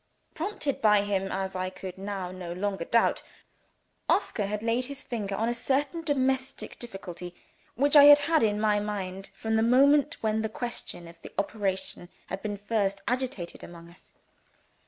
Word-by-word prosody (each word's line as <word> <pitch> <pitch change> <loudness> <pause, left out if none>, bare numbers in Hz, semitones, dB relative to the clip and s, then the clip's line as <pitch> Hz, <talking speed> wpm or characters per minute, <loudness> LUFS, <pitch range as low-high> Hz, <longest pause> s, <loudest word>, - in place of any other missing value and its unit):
Prompted 315 -5 -2
by 210 -2 +5
him, 195 -1 -1
as 190 0 -3
I 185 0 -1
could 185 -1 -8
now 195 -2 -4
no 180 -2 -6
longer 195 -1 -2
doubt, 230 +4 +2 0.9
Oscar 205 -3 +1
had 210 +1 -3
laid 235 +2 +1
his 280 +1 -6
finger 205 -5 -3
on 225 +3 0
a 240 - +1
certain 280 +7 -1
domestic 265 -3 -1
difficulty 180 -6 -8 0.4
which 285 +4 +2
I 290 -1 +10
had 290 0 +10
had 310 +2 +2
in 210 -1 +2
my 210 -1 +3
mind, 195 -2 -4
from 220 0 -1
the - - +3
moment 280 +6 +4
when 220 0 +1
the 220 - -2
question 225 -7 -6
of 170 0 -15
the - - -10
operation 195 -3 -3 0.2
had 190 - -5
been 205 -1 -3
first 200 -1 -1
agitated 250 -8 -3
among 170 -1 -11
us. 175 - -18
210 Hz, 170 wpm, -28 LUFS, 190-255 Hz, 0.9 s, I